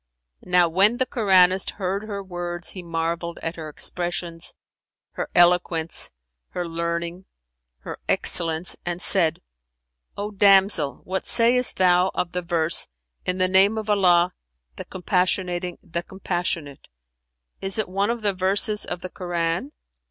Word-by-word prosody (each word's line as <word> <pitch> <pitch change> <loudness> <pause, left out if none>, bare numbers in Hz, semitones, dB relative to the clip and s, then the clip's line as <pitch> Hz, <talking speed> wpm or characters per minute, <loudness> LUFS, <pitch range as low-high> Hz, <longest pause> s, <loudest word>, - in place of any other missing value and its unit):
"[FN#365] - - -16
Now 180 -1 +5
when 195 +8 +3
the 260 - +1
Koranist 190 -5 +3
heard 195 +1 -3
her 200 -2 -5
words 175 -2 -3
he 185 - -7
marvelled 170 0 -3
at 165 +1 -3
her 155 -2 -7
expressions, 175 +1 -2 0.6
her - - -5
eloquence, 175 -2 +2 0.4
her 175 -1 -3
learning, 170 +2 -4 0.6
her - - -8
excellence, 165 0 +2
and 175 0 -4
said, 170 - +2 0.7
"O 205 +1 -4
damsel, 195 -6 +3
what 190 +1 -4
sayst 245 +2 +3
thou 180 0 +4
of 175 - -2
the 180 - -3
verse 170 -1 +1 0.4
'In 180 - 0
the 185 0 +2
name 195 +4 +4
of 215 -1 -2
Allah, 180 -3 +3 0.4
the - - -8
Compassionating, 180 -1 -1
the 170 -2 -4
Compassionate'? 175 -6 -4 0.7
Is 195 +1 -3
it 215 - -1
one 195 +3 -1
of 235 -1 -3
the 205 -1 +1
verses 195 +3 +1
of 175 - -6
the 185 - -6
Koran?" 175 - -3
180 Hz, 140 wpm, -23 LUFS, 170-195 Hz, 0.7 s, Now